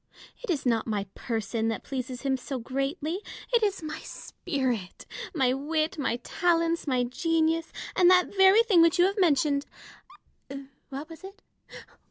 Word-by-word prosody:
It - - -7
is 305 -7 -1
not 230 -2 +1
my 210 -3 -1
person 225 -1 -2
that 225 - -2
pleases 255 -1 -5
him 270 -1 +1
so 265 +1 -5
greatly: 275 +8 -3 0.3
it 470 - +5
is 400 -5 0
my 310 0 -5
spirit, 250 -9 -4 0.3
my 260 -4 +2
wit, 310 +3 -1
my 265 -4 0
talents, 335 -2 +1
my 255 -3 +1
genius, 325 +5 0 0.2
and 360 -1 +5
that 365 +2 +4
very 385 +3 +6
thing 390 -7 +4
which 335 +2 +4
you 350 - +5
have 395 +2 0
mentioned 290 -4 +2 0.6
— 275 0 -13
what 280 +3 -6
was 325 +2 -12
it 395 +1 -12
300 Hz, 160 wpm, -27 LUFS, 260-345 Hz, 0.6 s, very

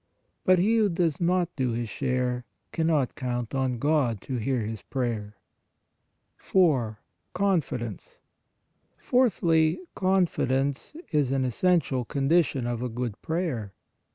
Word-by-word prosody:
But 185 -1 +6
he 215 +6 +3
who 215 -2 +3
does 170 -4 0
not 175 0 +1
do 130 -4 0
his 120 0 -2
share, 125 +1 -1 0.3
cannot 160 -5 +1
count 120 -2 -3
on 130 -2 0
God 140 -5 +1
to 130 - -4
hear 125 +3 0
his 110 0 -5
prayer. 115 -5 -3 1.0
4. 135 - +2 0.4
CONFIDENCE. 155 - -2 0.8
Fourthly, 170 -11 +2
confidence 160 - 0 0.2
is 145 -5 +2
an 135 -1 +1
es 125 -3 -4
sential 165 -9 +2
condition 140 -2 +1
of 120 -1 -2
a 125 - -2
good 120 -2 -4
prayer. 155 - -2
135 Hz, 125 wpm, -27 LUFS, 120-170 Hz, 1.0 s, But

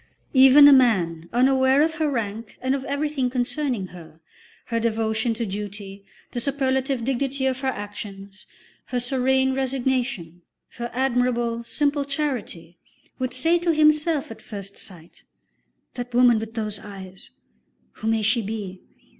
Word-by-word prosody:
Even 270 +2 +8
a 290 - +9
man 175 -11 +2
unaware 265 +3 +4
of 320 0 0
her 310 -1 +2
rank 225 -4 -4
and 260 +1 0
of 275 -1 -2
everything 280 -2 -1
concerning 245 -4 -2
her, 165 -3 -13 0.5
her 230 - -1
devotion 225 0 0
to 230 +1 -2
duty, 200 -1 -7 0.3
the 240 - -3
superlative 265 -1 -1
dignity 270 +1 -1
of 260 -1 0
her 265 - -3
actions, 205 -3 -7 0.4
her 250 - -2
serene 265 +1 +1
resignation, 255 -9 -2 0.4
her 240 0 -4
admirable, 240 -2 0
simple 285 +4 0
charity, 255 - -4 0.4
would 255 -1 -2
say 325 +8 +2
to 335 -1 +1
himself 305 -2 +3
at 225 - -10
first 200 -2 -7
sight: 170 -4 -9 0.7
"The 245 -1 -5
woman 240 -2 +5
with 225 0 -7
those 215 -2 -3
eyes, 190 -2 -11 0.7
who 220 - -5
may 225 -1 +1
she 220 +3 +3
be? 200 -3 -6
245 Hz, 140 wpm, -24 LUFS, 210-270 Hz, 0.7 s, a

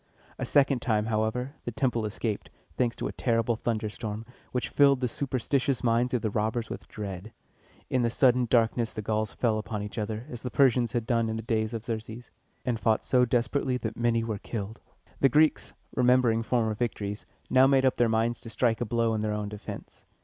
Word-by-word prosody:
A - - -1
second 135 -3 +3
time, 110 -3 +1
however, 110 +4 -1
the 120 - -3
temple 120 -3 0
escaped, 105 0 -3 0.3
thanks 120 -2 0
to - - -3
a - - -4
terrible 115 -1 +1
thunderstorm, 110 -1 -3 0.3
which 125 - -2
filled 140 -2 +5
the 125 - 0
superstitious 135 +1 -1
minds 120 +1 +2
of 120 - -1
the 110 - 0
robbers 110 +2 -1
with - - -7
dread. 100 0 -6 0.6
In 130 - +1
the 120 - +2
sudden 125 0 +3
darkness 115 -1 +2
the 110 - -6
Gauls 110 0 -1
fell 110 -3 +1
upon 105 -1 -4
each 105 +2 -5
other, 110 +2 -3
as 120 -2 -7
the 125 - -4
Persians 125 0 +3
had 120 -2 -1
done 115 -2 +1
in 110 - -2
the 110 - -5
days 110 -1 0
of 115 -1 -5
Xerxes, 115 +1 -6 0.3
and 120 -3 0
fought 110 -1 +1
so 125 -1 +4
desperately 125 +2 0
that 110 -3 -4
many 115 -1 +1
were 110 -3 -3
killed. 110 0 -5 0.4
The 135 - +5
Greeks, 155 +4 +3 0.2
remembering 125 -2 +3
former 115 -2 +1
victories, 105 -2 -3 0.2
now 130 +1 +6
made 135 -1 +4
up 130 - +2
their 120 -1 +3
minds 115 +1 0
to 115 - -9
strike 115 0 +1
a - - +1
blow 115 0 +1
in 110 - -1
their 105 0 -1
own 105 -1 -3
defense. 105 0 -9
115 Hz, 200 wpm, -28 LUFS, 110-125 Hz, 0.6 s, now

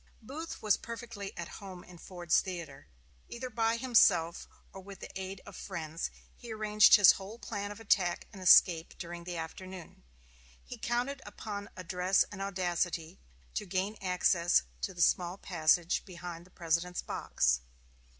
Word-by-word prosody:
Booth 295 +8 -7
was 210 -2 +4
perfectly 230 -4 -7
at 170 - -4
home 185 -3 -9
in 175 -1 -14
Ford's 175 -2 +1
Theater. 165 - -7 0.4
Either 250 +1 -6
by 225 0 +1
himself, 200 -9 +3 0.3
or 195 - -9
with 195 0 -11
the - - -9
aid 190 0 -5
of 205 - -11
friends, 165 -4 -4 0.3
he 240 -2 -10
arranged 215 -1 +6
his 205 -4 +9
whole 200 +4 -7
plan 205 -3 -5
of 205 - -9
attack 190 -5 +1
and 195 - -10
escape 170 -2 +6
during 170 -1 -7
the 175 -1 -4
afternoon. 180 - -8 0.6
He - - -9
counted 250 +4 -1
upon 205 -1 -7
address 185 +1 +2
and 200 -1 -7
audacity 175 -4 -2 0.3
to - - -3
gain 190 +3 -1
access 180 -2 +3 0.2
to 190 - -3
the 175 - +3
small 180 +1 +2
passage 170 -2 +2
behind 175 -2 -8
the - - -21
President's 170 +1 -1
box. - - 0
185 Hz, 150 wpm, -31 LUFS, 175-205 Hz, 0.6 s, his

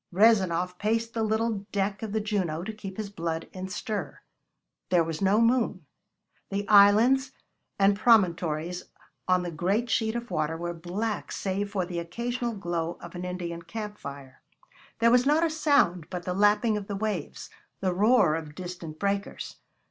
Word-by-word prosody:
Rezanov 180 -3 +3
paced 225 +2 0
the 225 - -1
little 220 -2 0
deck 195 0 -1
of 220 -2 -4
the 220 - 0
Juno 190 -7 -1
to 220 - -5
keep 195 -3 -8
his 210 -2 -4
blood 165 -3 -3
in 185 0 -5
stir. 210 +1 -4 0.7
There 175 -2 +4
was 165 +1 -4
no 195 +2 +4
moon. 230 -7 +2 0.6
The 200 +1 -3
islands 225 +7 +6 0.4
and 200 0 +4
promontories 180 -6 +2 0.4
on 185 -1 +3
the 175 - -4
great 195 +9 0
sheet 220 0 +1
of 235 0 -5
water 155 +1 -1
were 175 +1 -3
black 190 +6 -4
save 200 +1 -2
for 195 -3 -1
the 175 -1 -4
occasional 235 +7 -3
glow 175 -3 -3
of 175 - -10
an 175 0 -6
Indian 175 -2 -4
camp 210 +4 -7
fire. 140 -2 -9 0.6
There 230 0 +4
was 250 +2 +4
not 305 +3 +4
a 325 - 0
sound 285 - +2
but 180 -2 -5
the 180 - -1
lapping 210 +3 +3
of 200 -1 -6
the 200 - -3
waves, 200 -6 -4 0.3
the 185 -2 0
roar 210 -3 +4
of 155 -2 -5
distant 175 -3 -7
breakers. 200 +1 -3
195 Hz, 170 wpm, -27 LUFS, 175-220 Hz, 0.7 s, islands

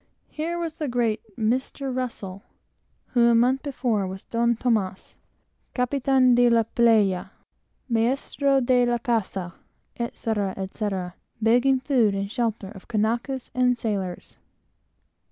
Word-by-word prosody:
Here 330 +3 -3
was 335 -2 -3
the 305 -1 -4
great 235 -3 0 0.2
Mr. 255 +3 -1
Russell, 205 -7 -4 0.7
who 240 -1 +4
a 235 - +5
month 255 +3 +3
before 245 -8 -1
was 190 +1 -7
"Don 235 0 +1
Tomàs," 215 -6 -1 0.6
"Capitán 260 0 +3
de 245 0 +5
la 230 -1 +4
playa," 220 -5 +2 0.6
"Maéstro 265 +3 +1
de 250 0 +4
la 240 0 +1
casa," 215 -7 -2 0.5
etc., 220 -4 -2
etc., 190 -2 -3 0.3
begging 245 +4 +3
food 240 -7 +2
and 195 0 -3
shelter 225 -5 -2
of 195 -3 -13
Kanakas 235 +4 -1
and 250 -1 +2
sailors. 195 -6 -4
235 Hz, 120 wpm, -25 LUFS, 210-255 Hz, 0.7 s, a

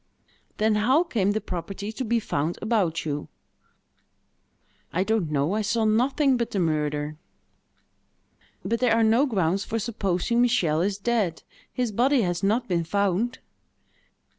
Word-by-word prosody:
"Then 215 +1 +2
how 255 +10 +3
came 215 - 0
the 215 - 0
property 195 +1 -5
to 240 +4 -4
be 235 0 +1
found 160 -5 -2
about 195 -8 0
you?" 145 -1 -3 1.6
"I 180 - +1
don't 215 -6 0
know: 150 +4 0
I 215 - 0
saw 220 +2 0
nothing 260 +5 +2
but 235 -1 -2
the 200 - -2
murder." 150 -2 -1 1.5
"But 230 - 0
there 245 -3 +3
are 230 - +3
no 230 +6 +4
grounds 195 -4 0
for 225 - -3
supposing 220 0 0
Michel 185 -11 +2
is 195 +2 0
dead: 205 -6 -1 0.3
his 245 -3 -2
body 250 +4 +2
has 175 -1 -1
not 220 +5 +1
been 175 -4 0
found." 200 +7 0
210 Hz, 145 wpm, -25 LUFS, 175-235 Hz, 1.6 s, no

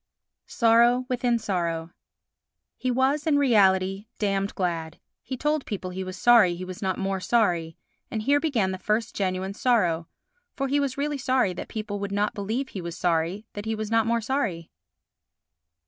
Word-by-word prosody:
Sorrow 235 +2 +4
within 245 -1 +1
Sorrow 170 -6 -2 0.8
He 255 - -2
was 265 +5 +1
in 295 -2 +4
reality 195 -6 +3
damned 195 -1 -1
glad; 165 -3 -2 0.2
he 260 - -6
told 300 +1 0
people 190 -3 -4
he 190 +1 -4
was 185 0 -7
sorry 215 -6 +5
he 185 +1 -6
was 185 -1 -8
not 190 -2 -1
more 195 0 -1
sorry, 175 -6 +1 0.3
and 220 -1 -3
here 285 +4 +3
began 240 -12 0
the 185 - -5
first 215 +4 -1
genuine 190 0 -2
sorrow, 180 -9 +1 0.5
for 275 - -1
he 285 +2 +2
was 275 -2 -1
really 290 0 -1
sorry 255 -7 +1
that 175 - -7
people 210 -2 -5
would 200 0 -4
not 205 +1 0
believe 225 +7 -3
he 190 - -6
was 170 -1 -6
sorry 175 +4 0
that 205 0 -6
he 220 0 -1
was 215 0 -5
not 225 -1 +3
more 235 0 +1
sorry. 220 - -2
210 Hz, 175 wpm, -26 LUFS, 185-245 Hz, 0.8 s, sorry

